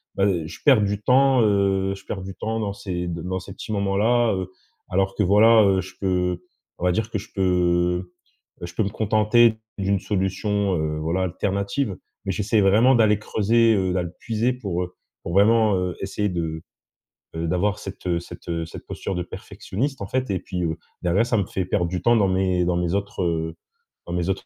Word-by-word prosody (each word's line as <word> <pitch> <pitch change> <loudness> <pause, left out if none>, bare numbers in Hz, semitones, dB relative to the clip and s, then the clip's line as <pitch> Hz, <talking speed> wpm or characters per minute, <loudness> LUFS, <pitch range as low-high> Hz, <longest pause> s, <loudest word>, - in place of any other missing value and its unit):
bah, 100 - +2 0.2
je - - -9
perds 130 -7 +6
du 100 0 0
temps, 130 +1 +4
heu, 95 -2 +2
je 95 - -14
perds 95 - -5
du 95 +1 -7
temps 110 +3 -3
dans 105 -2 -2
ces 90 -3 -4
d 85 -1 -4
dans 95 +1 -2
ces 95 - -10
petits - - -8
moments 100 -2 0
là, 120 +2 +3
heu, 95 -1 -3 0.4
alors 95 +1 +1
que, - - 0
voilà, 110 +4 +6
heu, 95 -2 +3
je 95 +1 -10
peux 90 -2 0 0.4
on 90 - -2
va 90 - +4
dire, 110 +4 -1
que 105 - -1
je 95 - -11
peux, 95 - -2 1.2
heu, - - -4
je 85 - -9
peux 110 - +1
me 100 - -1
contenter 110 +2 +3 0.2
d'une 100 0 +1
solution, 100 0 -1
heu, 75 0 -2
voilà, 85 +4 -1
alternative. 100 +5 -1 0.3
Mais, 95 - 0
j'essaie 105 +2 +1
vraiment 110 +7 +5
d'aller 105 -3 +4
creuser, 115 +2 +2
heu, 95 -2 0
d’aller 90 -2 -1
puiser 115 +2 0
pour, 100 -8 -3
heu, 90 0 -9 0.3
pour 85 - -5
vraiment, 110 +1 +4
heu, 90 -1 -2
essayer 105 +1 -1
de, 80 -3 -3 0.7
heu, 80 0 -2
d'avoir 95 +5 0
cette, 95 -1 -9
heu 85 -1 +1
cette, 85 - -12
heu, 85 -1 -2
cette 80 - -10
posture - - -4
de 90 - -1
perfectionniste, 130 +9 -5
en 100 - -4
fait 130 +1 -1
et 95 - 0
puis, 90 -2 -4
heu, 80 -1 -1 0.3
derrière 90 +6 +2
ça 120 -2 +1
me 100 - +1
fait 95 - -3
perdre 90 -1 0
du 90 0 -3
temps 120 +5 +4
dans 105 -4 +3
mes 95 -1 +1
dans 90 0 +1
mes 85 0 -1
autres, 100 -1 -3
heu, 80 -1 -1 0.5
dans 85 - -5
mes 90 +1 -1
autres 95 - -2
95 Hz, 215 wpm, -23 LUFS, 90-105 Hz, 1.2 s, perds